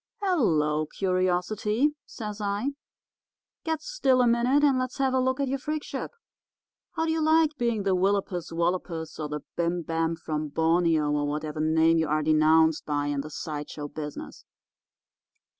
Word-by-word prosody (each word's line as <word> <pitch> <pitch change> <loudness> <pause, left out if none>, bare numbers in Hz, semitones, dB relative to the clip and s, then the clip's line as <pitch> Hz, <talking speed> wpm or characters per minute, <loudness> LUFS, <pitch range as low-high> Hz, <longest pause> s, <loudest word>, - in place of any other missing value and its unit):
"'Hello, 155 - +1
Curiosity,' 190 - 0
says 210 -2 -6
I. 205 +7 -1 0.9
'Get 320 -1 -2
still 275 - +2
a - - +3
minute 240 +5 +3
and 275 -3 +4
let's 255 +1 -3
have 265 -1 +1
a 260 - +3
look 260 +1 0
at 280 - 0
your 270 +1 -1
freakship. 305 +2 -4 0.8
How 325 - -1
do 320 - 0
you 320 0 0
like 315 -1 +3
being 235 -5 -1
the 195 -1 +2
willopus 190 -2 0
wallopus 165 -2 -2
or 150 -1 -3
the 150 0 -4
bim 170 0 -1
bam 165 +1 -1
from 155 -2 -3
Borneo, 160 0 +2
or 145 0 0
whatever 150 +1 -3
name 160 +1 +3
you 160 - +1
are 155 +1 +1
denounced 155 +1 +4
by 145 -1 -1
in 140 - -1
the 155 - -8
side 150 -1 -5
show 145 -1 -6
business? 150 0 -7
175 Hz, 160 wpm, -27 LUFS, 155-255 Hz, 0.9 s, and